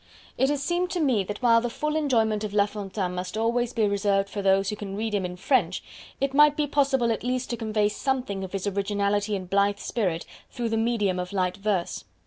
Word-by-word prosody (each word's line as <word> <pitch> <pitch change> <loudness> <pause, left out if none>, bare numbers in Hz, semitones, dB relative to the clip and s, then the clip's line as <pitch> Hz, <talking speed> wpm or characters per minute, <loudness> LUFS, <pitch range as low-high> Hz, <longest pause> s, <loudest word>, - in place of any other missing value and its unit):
It 265 +2 +2
has 290 -1 -1
seemed 350 +3 0
to 360 - -1
me 255 -10 +2
that 205 +6 -6
while 230 -1 +5
the 240 - -2
full 300 +6 -2
enjoyment 225 -8 +1
of 210 -1 -4
La 200 -1 +5
Fontaine 195 -3 -4
must 180 +3 -4
always 235 +2 +1
be 225 -3 +1
reserved 200 -1 +1
for 205 - -3
those 195 0 +3
who 210 - -2
can 200 -2 -6
read 220 +1 -2
him 200 -2 0
in 180 0 -5
French, 190 -2 +1 0.4
it 275 0 0
might 295 +1 +6
be 300 - +2
possible 270 -4 +2
at 225 - -2
least 250 +1 -2
to - - 0
convey 215 -2 0
something 210 -3 -2
of 190 - -7
his 195 0 -3
originality 205 +1 0
and 185 -2 -5
blithe 200 +2 +2
spirit 185 -7 -2 0.2
through 235 -1 -3
the 225 - 0
medium 220 -5 +1
of 180 +1 -4
light 185 -1 0
verse. 200 -3 -1
210 Hz, 225 wpm, -26 LUFS, 195-245 Hz, 0.4 s, might